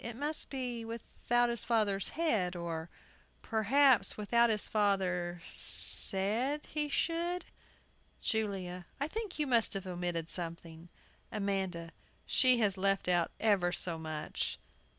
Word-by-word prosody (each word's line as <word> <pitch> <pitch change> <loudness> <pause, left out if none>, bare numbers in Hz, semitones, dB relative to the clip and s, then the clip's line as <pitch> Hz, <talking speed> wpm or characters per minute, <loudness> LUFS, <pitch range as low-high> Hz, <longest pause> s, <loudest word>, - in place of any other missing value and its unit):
It 235 0 -6
must 295 +5 -4
be 250 -4 -4
"without 235 +1 -1
his 235 - -3
father's 210 -4 +1
head," 215 - +1
or, 170 -1 -5 0.5
perhaps, 230 0 +4
"without 235 +3 +3
his 215 -2 +1
father 180 -4 0
said" 230 +10 +2
he 300 -1 0
should. 340 +4 -1 0.7
JULIA. 190 -5 -3
I 285 - -1
think 425 +2 -5
you 300 - 0
must 235 -5 +4
have 195 -1 -4
omitted 175 -2 -3
something. 165 -1 -3 0.4
AMANDA. 190 -5 -3 0.3
She 255 -1 +4
has 205 -4 +1
left 195 0 0
out 175 -2 +2
ever 195 -5 +2
so 170 -2 +1
much! 155 -1 -4
205 Hz, 125 wpm, -32 LUFS, 180-240 Hz, 0.7 s, perhaps